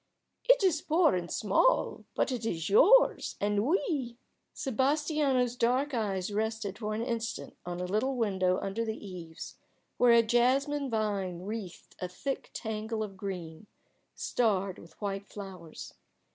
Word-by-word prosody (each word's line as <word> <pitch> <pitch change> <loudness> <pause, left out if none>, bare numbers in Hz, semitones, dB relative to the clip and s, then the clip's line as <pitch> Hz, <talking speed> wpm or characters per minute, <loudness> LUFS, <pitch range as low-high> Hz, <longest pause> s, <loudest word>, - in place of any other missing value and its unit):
"It - - +6
is 330 -5 +3
poor 320 +1 +3
and 175 -1 -2
small, 215 - +2
but - - +1
it 245 -3 -3
is 170 -5 -2
yours 440 - +5
and 205 0 +1
we 285 -8 0 0.2
" - - -50
Sebastiano's 270 -1 +1
dark 255 +5 +1
eyes 205 -4 -1
rested 220 -1 -2
for 215 -1 -2
an 225 - -2
instant 230 -2 -4
on 175 0 -4
a 180 - -2
little 215 +8 0
window 190 -5 +1
under 200 +4 -2
the 220 -1 -3
eaves 175 -5 -9 0.4
where 245 -1 +6
a 230 0 +6
jasmine 265 +5 +2
vine 200 -6 -1
wreathed 205 -3 -7
a 180 - -3
thick 270 +10 -4
tangle 220 0 -3
of 200 -2 -7
green, 185 -2 -6 0.5
starred 200 -5 0
with 165 -1 -16
white 200 -1 -3
flowers. 185 -6 -9
220 Hz, 145 wpm, -30 LUFS, 195-255 Hz, 0.5 s, It